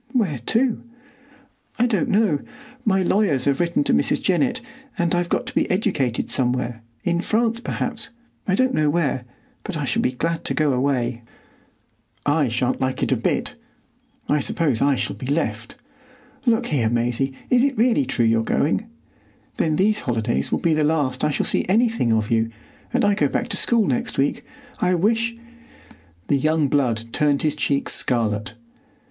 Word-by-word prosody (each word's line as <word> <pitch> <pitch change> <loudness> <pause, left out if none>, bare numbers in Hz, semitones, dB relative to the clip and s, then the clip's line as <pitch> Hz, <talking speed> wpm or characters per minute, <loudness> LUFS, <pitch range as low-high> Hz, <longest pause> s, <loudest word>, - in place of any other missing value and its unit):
"Where 190 - 0
to?" 240 0 +2 1.0
"I 240 - +3
don't 220 -6 0
know. 200 -8 +2 0.4
My 190 -4 +2
lawyers 175 -9 +2
have 140 -1 +1
written 170 -3 +1
to - - +1
Mrs. 75 - +2
Jennett, - - +1 0.4
and 170 -1 +1
I've 175 0 0
got - - 0
to - - -7
be - - +1
educated 165 - 0
somewhere,—in 120 +4 -2
France, 230 +3 +1
perhaps,—I 235 -4 -4
don't 260 +4 +2
know 150 -1 +2
where; 145 -6 0 0.4
but 200 -6 -4
I 145 - -2
shall - - 0
be 125 - 0
glad 165 +5 -2
to - - 0
go 150 -3 +2
away." 125 -2 0 1.0
"I 145 -1 +2
shan't 125 +2 -1
like 130 0 -1
it - - 0
a - - +4
bit. - - -1 0.7
I 150 - +2
suppose 140 -4 0
I 140 -1 +3
shall - - -3
be 130 - -7
left. 145 +4 -2 0.7
Look 230 -1 +3
here, 125 -7 +1
Maisie, 120 +3 0
is 250 0 +5
it 275 -3 +1
really 240 +4 +3
true 120 - +1
you're 115 0 +3
going? 160 - 0 0.7
Then 155 -2 +1
these 210 +5 +2
holidays 115 -2 -1
will - - +2
be 165 - +2
the 155 0 +2
last 145 -4 0
I - - +3
shall 145 - -1
see - - +1
anything 225 - +2
of 110 -1 0
you; 115 0 +2 0.4
and - - +2
I 205 - +4
go 150 -7 +2
back - - -2
to - - 0
school 230 -3 +3
next 130 -5 -1
week. 135 +1 0 0.4
I 180 0 +2
wish——" 230 +5 +1 0.9
The 140 - +2
young 155 0 +1
blood 115 -5 0
turned 145 -2 +2
his 150 -1 +2
cheeks 140 -2 0
scarlet. 110 -2 -1
150 Hz, 170 wpm, -22 LUFS, 125-200 Hz, 1.0 s, is